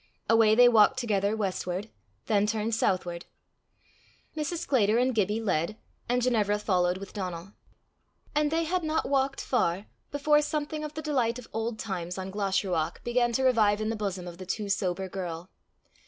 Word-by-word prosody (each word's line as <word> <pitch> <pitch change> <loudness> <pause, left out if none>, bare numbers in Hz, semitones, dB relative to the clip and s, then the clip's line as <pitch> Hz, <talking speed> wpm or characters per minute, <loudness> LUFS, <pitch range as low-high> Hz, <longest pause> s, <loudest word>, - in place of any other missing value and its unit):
Away 225 -1 +5
they 245 +1 +8
walked 230 +2 +5
together 210 -4 0
westward, 190 0 -3 0.3
then 210 -2 +2
turned 220 +1 -1
southward. 180 -5 -1 1.1
Mrs. 310 +3 -2
Sclater 220 -5 +3
and 255 +1 +2
Gibbie 210 0 +1
led, 195 +1 0 0.3
and 245 0 +1
Ginevra 215 -4 +2
followed 180 -3 +1
with 195 0 -9
Donal. 185 -1 -5 0.8
And 300 0 +2
they 325 +2 +1
had 355 +2 -1
not 315 0 0
walked 270 0 0
far, 195 -6 0 0.2
before 295 +1 +3
something 300 0 -3
of 300 -1 -6
the 310 - -5
delight 255 -6 0
of 250 - -10
old 225 0 -2
times 180 -5 -4
on 190 0 -5
Glashruach 190 -5 -1
began 240 0 +1
to 265 - +1
revive 215 -5 +3
in 215 0 -1
the 225 - -1
bosom 195 -4 -4
of 175 0 -9
the 185 - -7
too 205 +1 -3
sober 190 -1 -1
girl. 180 -1 -6
215 Hz, 170 wpm, -28 LUFS, 190-250 Hz, 1.1 s, they